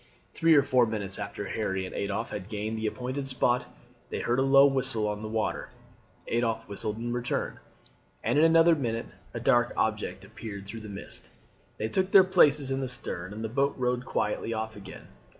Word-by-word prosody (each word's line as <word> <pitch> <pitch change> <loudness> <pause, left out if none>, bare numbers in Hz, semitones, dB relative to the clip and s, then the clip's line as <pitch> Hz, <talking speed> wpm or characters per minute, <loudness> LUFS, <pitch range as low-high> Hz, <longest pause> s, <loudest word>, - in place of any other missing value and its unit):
Three 165 -1 +4
or 140 - +6
four 125 -3 +3
minutes 100 -3 -3
after 100 0 -5
Harry 95 -2 -2
and 90 - -8
Adolphe 100 +3 -3
had 100 0 -6
gained 110 0 -3
the 110 0 -2
appointed 125 +5 -3
spot 125 -1 +1 0.4
they - - -3
heard 120 +2 0
a - - +4
low 135 +1 +7
whistle 130 -5 +1
on 105 0 -3
the 110 - -5
water. 110 0 -2 0.6
Adolphe 115 -1 0
whistled 105 +1 -2
in 120 +1 -3
return, 120 0 -2 0.6
and 145 - +2
in - - +5
another 165 +1 +6
minute 115 -9 -2 0.2
a - - -2
dark 120 0 +3
object 100 -3 -1
appeared 100 -1 -8
through 110 +3 -7
the 110 - -9
mist. 100 -1 -5 0.5
They 110 - -1
took 185 +10 +1
their 195 -1 +8
places 145 -6 +4
in 135 - 0
the 130 - -2
stern, 90 -6 -3
and 110 +2 -6
the - - -1
boat 140 +5 0
rowed 125 -1 0
quietly 115 -1 -1
off 110 0 -4
again. 100 - -10
115 Hz, 195 wpm, -28 LUFS, 105-135 Hz, 0.6 s, their